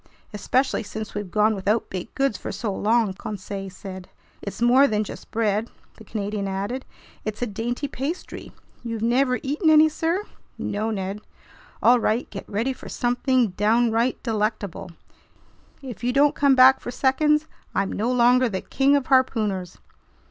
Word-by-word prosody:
"Especially 260 +6 0
since 220 0 -7
we've 205 -2 -4
gone 210 +4 +3
without 205 +3 -1
baked 185 +3 -6
goods 270 -5 +1
for - - -6
so 215 -4 -3
long," 220 0 +1
Conseil 195 0 -6
said. 185 0 -9 0.3
"It's 200 - -7
more 250 +4 +5
than 215 -2 0
just - - -10
bread," 220 0 0 0.3
the 220 - -13
Canadian 205 -1 -3
added. 200 +7 -3 0.4
"It's 215 +2 -4
a - - +2
dainty 240 +6 -3
pastry. 285 +7 -5 0.3
You've 230 -2 -4
never 250 +2 +2
eaten 300 +4 +1
any, 310 0 +7
sir?" 330 +5 -1 0.3
"No, 215 +2 -2
Ned." 200 -1 -4 0.6
"All 245 +1 +6
right, 225 +2 0
get 195 - -8
ready 230 +6 -1
for - - -11
something 245 -1 +1
downright 230 +5 +1
delectable! 215 -5 -2 0.9
If 250 -3 -8
you 245 - +1
don't 285 +2 +4
come 280 -2 +3
back 260 +1 +7
for - - -7
seconds, 300 +4 +2 0.3
I'm 195 -1 0
no 230 +4 -1
longer 250 0 +4
the 190 -3 -3
King 275 +2 +2
of 280 -2 +1
Harpooners!" 215 -9 +1
230 Hz, 155 wpm, -24 LUFS, 205-260 Hz, 0.9 s, any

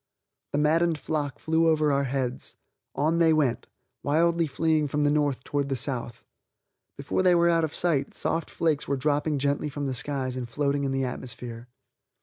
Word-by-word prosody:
The - - +1
maddened 160 +2 +2
flock 145 -3 -3
flew 160 +1 +1
over 155 -2 +3
our 140 0 +1
heads; 130 -1 -3 0.4
on 160 +3 +1
they 165 -1 +5
went, 150 -6 +1 0.3
wildly 165 +3 +2
fleeing 155 +1 +1
from 150 +1 -1
the 145 - +3
north 145 -4 0
towards 140 -1 -2
the 135 - 0
south. 125 -2 -4 0.7
Before 140 +6 -1
they 180 -1 +5
were 170 0 +4
out 165 -1 +2
of 155 - -2
sight, 150 -6 0
soft 165 -2 -2
flakes 155 -3 0
were 140 - 0
dropping 145 +2 0
gently 140 +2 0
from 145 0 -4
the 135 - -1
skies 130 0 -2
and 125 -2 -5
floating 140 +2 0
in 135 - -1
the 135 0 0
atmosphere. 120 -1 -6
145 Hz, 180 wpm, -26 LUFS, 135-160 Hz, 0.7 s, they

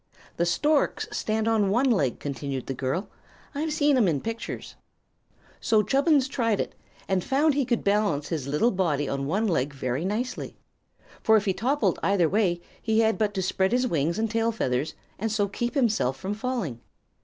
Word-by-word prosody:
"The 170 - +1
storks 295 - +1
stand 220 0 -1
on 215 -3 +2
one 240 +7 +2
leg," 140 - +1
continued 135 -1 -4
the 135 - -3
girl. 135 - -2 0.5
"I've 305 +2 -2
seen 290 -1 +3
'em 225 -6 +4
in 155 -5 +1
pictures." 225 - -5 0.9
So 215 -1 +3
Chubbins 280 - +3
tried 230 -6 0
it, - - -2 0.3
and 190 -2 +1
found 290 +3 +2
he 280 -1 +1
could 240 -1 0
balance 200 -8 +1
his 150 -6 -3
little 150 +13 +2
body 155 -7 0
on 140 0 -2
one 205 +8 +1
leg 140 -6 0
very 130 +2 -2
nicely. 220 +7 -3 0.6
For 220 0 +5
if 210 - -1
he 190 - +2
toppled 265 +9 0
either 195 -4 +3
way 185 -3 +1 0.2
he 220 0 +2
had 220 0 +2
but 210 -1 0
to 190 - -1
spread 190 +2 +1
his 250 +1 +2
wings 165 - 0
and 225 +1 +1
tail 225 +1 +1
feathers 130 - -1 0.2
and 220 +2 -1
so 205 -2 +1
keep 240 +7 -3
himself 215 - +1
from 190 +8 -3
falling. 210 - -3
205 Hz, 185 wpm, -26 LUFS, 160-235 Hz, 0.9 s, For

